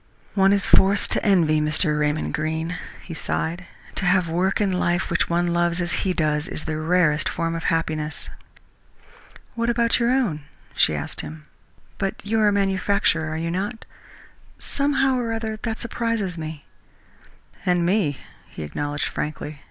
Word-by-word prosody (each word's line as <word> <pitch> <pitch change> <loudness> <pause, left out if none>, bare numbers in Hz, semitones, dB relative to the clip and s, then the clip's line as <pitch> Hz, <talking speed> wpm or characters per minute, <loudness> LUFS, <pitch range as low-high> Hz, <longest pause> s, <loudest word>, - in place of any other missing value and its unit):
"One 195 -1 +4
is 200 0 +2
forced 195 +1 +4
to - - +1
envy 165 -7 +4
Mr. 150 0 +1
Raymond 150 +1 0
Greene," 160 +3 -2 0.3
he 170 - -7
sighed. 170 +2 -3 0.3
"To - - -2
have 180 -1 +3
work 180 +4 +1
in 205 -2 +2
life 175 -1 0
which 170 - +1
one 170 0 +1
loves 175 0 +1
as 175 -2 -1
he 190 - +1
does 155 -3 +1
his 175 - -5
is - - -11
the 155 -1 -2
rarest 155 -3 +2
form 165 -1 -1
of 165 0 -4
happiness." 155 -1 -1 1.3
"What 230 0 -1
about 235 0 +3
your 235 0 +2
own?" 240 - +1 0.3
she - - +4
asked - - -4
him. 155 0 -9 0.6
"But 195 -1 -1
you 220 +2 +1
are 215 - +4
a - - +5
manufacturer, 195 -4 +1
are 155 - -3
you 165 +1 -2
not? 205 +6 -3 0.7
Somehow 270 -2 +1
or 235 -2 -2
other, 220 -1 -3
that 225 -2 -3
surprises 230 -5 -2
me." 155 -3 -6 1.0
"And 180 -1 +2
me," 175 -7 +1 0.3
he - - -7
acknowledged 145 - -3
frankly. 150 -1 -4
175 Hz, 165 wpm, -23 LUFS, 155-200 Hz, 1.3 s, a